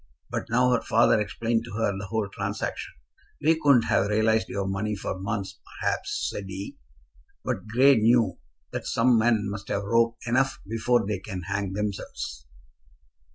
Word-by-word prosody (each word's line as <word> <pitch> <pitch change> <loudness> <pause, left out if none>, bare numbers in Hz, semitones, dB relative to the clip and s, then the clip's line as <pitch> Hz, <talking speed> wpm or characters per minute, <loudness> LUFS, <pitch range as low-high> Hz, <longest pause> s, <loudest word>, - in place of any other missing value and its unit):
But - - -3
now 125 +2 +3
her 125 - +2
father 115 -1 +4
explained 115 +2 -1
to 120 - -9
her 105 -2 0
the 100 +1 -6
whole 110 0 -1
transaction. 95 - -4 0.5
"We 160 +2 +3
couldn't 140 -5 +5
have 100 - +2
realized 110 -1 +2
your 100 -1 -2
money 105 +2 -1
for 95 -1 -4
months, 100 0 -4 0.2
perhaps," - - -1
said 100 - -5
he; 95 +1 -6 0.7
"but 95 - -3
Grey 130 +4 +5
knew 110 -4 +3 0.3
that - - -4
some 115 0 +3
men 110 -1 +3
must 100 0 -6
have 100 - -1
rope 115 +2 +2
enough 130 +2 +1
before 115 +1 +1
they 105 -2 -2
can 95 -2 -6
hang 100 +1 -2
themselves." 95 -9 -4
110 Hz, 160 wpm, -26 LUFS, 100-115 Hz, 0.7 s, couldn't